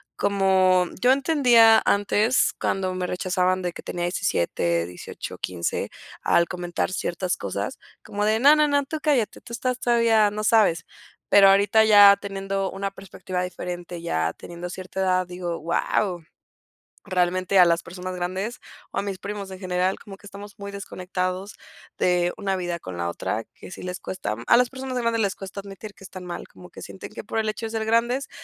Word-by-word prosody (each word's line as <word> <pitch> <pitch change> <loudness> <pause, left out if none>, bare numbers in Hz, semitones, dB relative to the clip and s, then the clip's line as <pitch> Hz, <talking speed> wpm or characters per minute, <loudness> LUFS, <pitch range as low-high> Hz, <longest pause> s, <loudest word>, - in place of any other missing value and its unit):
Como 190 -2 +3
Yo 250 +1 +6
entendía 245 -6 +5
antes 205 +4 +2
cuando 185 -1 -1
me 180 -1 -2
rechazaban 185 0 0
de 180 -1 -2
que - - -10
tenía 175 0 -4
17, 85 - 0
18, 90 +1 -8
15, 85 -2 -2 0.3
al 170 - +3
comentar 175 -1 -3
ciertas 180 0 -2
cosas, - - -4 0.2
como 205 +1 -2
de 215 +1 +2
no, 285 +3 +8
no, 300 0 +4
no, 285 0 +2
tú 310 +2 -4
cállate, 275 -8 +1
tú 235 - -11
estás 250 +1 -2
todavía 230 -3 +3
no 215 +1 -4
sabes. 210 -6 +3 0.4
Pero 200 -1 +7
ahorita 205 +3 +5
ya 205 -2 +8
teniendo 195 -1 -3
una 195 0 -3
perspectiva 185 -2 -5
diferente, 175 -1 -6
ya 80 - -1
teniendo 175 +1 -8
cierta 185 +1 -7
edad, 185 -1 +1
digo: 175 -1 -4
"Wao". 175 +2 -1 0.8
Realmente 185 0 +1
a 180 - +9
las 170 0 +2
personas 180 +1 -7
grandes, 185 +6 -3 0.3
o - - -6
a - - +1
mis 200 -1 -4
primos 200 -1 -6
en 185 - -8
general, 185 0 -1
como 195 -2 -11
que 200 - -19
estamos 205 0 -10
muy 200 0 -7
desconectados 185 0 -4 0.4
de 175 -1 +2
una 195 -2 -1
vida 175 -2 -3
con 95 - -8
la 85 0 -1
otra 110 +5 -3
que - - -12
sí - - -9
les 180 0 -5
cuesta. 105 - -4
A - - +6
las 250 0 +4
personas 260 -1 -5
grandes 230 -2 0
les 200 -1 0
cuesta 195 +1 -8
admitir 200 +1 -9
que 195 - -14
están 185 0 -9
mal, 175 -1 -7
como 180 - -15
que - - -12
sienten 190 - -9
que - - -8
por 225 - -2
el 215 -1 0
hecho 215 +2 -4
de 220 - -5
ser 220 -1 -2
grandes 235 +4 +1
195 Hz, 185 wpm, -24 LUFS, 180-215 Hz, 0.8 s, a